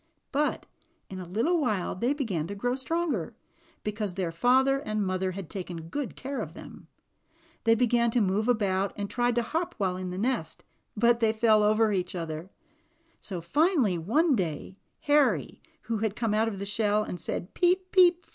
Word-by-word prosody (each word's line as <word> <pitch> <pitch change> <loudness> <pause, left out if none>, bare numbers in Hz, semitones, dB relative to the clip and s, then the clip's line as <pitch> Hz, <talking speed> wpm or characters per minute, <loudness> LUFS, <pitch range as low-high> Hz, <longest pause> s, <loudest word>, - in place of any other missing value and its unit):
But 295 +1 0 0.5
in 190 - -6
a 180 - -7
little 245 - +1
while 215 -9 0
they 235 +8 0
began 215 - -2
to 200 - -5
grow 245 +5 -1
stronger, 265 - -1 0.5
because 210 -3 -2
their 185 -3 -2
father 260 +9 +3
and 215 -6 -2
mother 185 0 -1
had 195 -2 -6
taken 175 -3 -6
good 285 +5 -4
care 275 +1 -4
of - - -7
them. - - -12 0.8
They 225 0 +5
began 235 0 +2
to 240 - +1
move 205 +2 +1
about 200 -4 +1
and 200 0 -4
tried 245 0 +1
to 240 - +2
hop 335 +8 -2
while 185 -3 0
in 185 0 -4
the 180 - -5
nest, 210 -7 -2 0.3
but 235 +2 +4
they 225 -2 +3
fell 220 -1 +4
over 215 +1 +3
each 185 -2 -2
other; 165 0 -5 0.7
so 185 -4 -4
finally 260 - +2
one 285 - +2
day, 175 -3 -3 0.3
Harry, 270 - +2 0.2
who 225 0 -2
had 215 -1 -1
come 225 -3 -1
out 220 +1 +2
of 215 -3 -3
the 200 - -4
shell 210 0 +1
and 180 -4 -6
said 175 - -4
"peep, 370 +1 +1
peep!" 355 -2 +5
215 Hz, 185 wpm, -28 LUFS, 190-255 Hz, 0.8 s, They